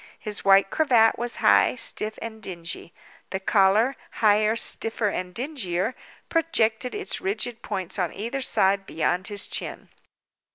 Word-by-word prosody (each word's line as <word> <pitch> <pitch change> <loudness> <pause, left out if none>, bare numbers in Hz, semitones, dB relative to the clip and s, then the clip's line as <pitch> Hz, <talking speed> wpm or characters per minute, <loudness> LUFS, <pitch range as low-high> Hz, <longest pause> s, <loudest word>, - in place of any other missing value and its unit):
His 210 -2 -6
white 195 0 +5
cravat 245 -8 +4
was 240 0 -1
high, - - +5
stiff, 215 -3 -3
and 220 -1 -7
dingy; 170 -3 -6 0.4
the 190 - -3
collar, 205 +6 +3 0.2
higher, 215 0 +3
stiffer, 225 -1 +1
and 180 -2 -4
dingier, 225 - -2 0.3
projected 250 -8 +1
its 410 -1 -3
rigid 370 - -3
points 190 -3 -4
on 180 -3 0
either 235 +6 -4
side 195 -5 +2
beyond 175 +3 -1
his 205 0 -3
chin. - - -5
215 Hz, 135 wpm, -25 LUFS, 195-240 Hz, 0.4 s, white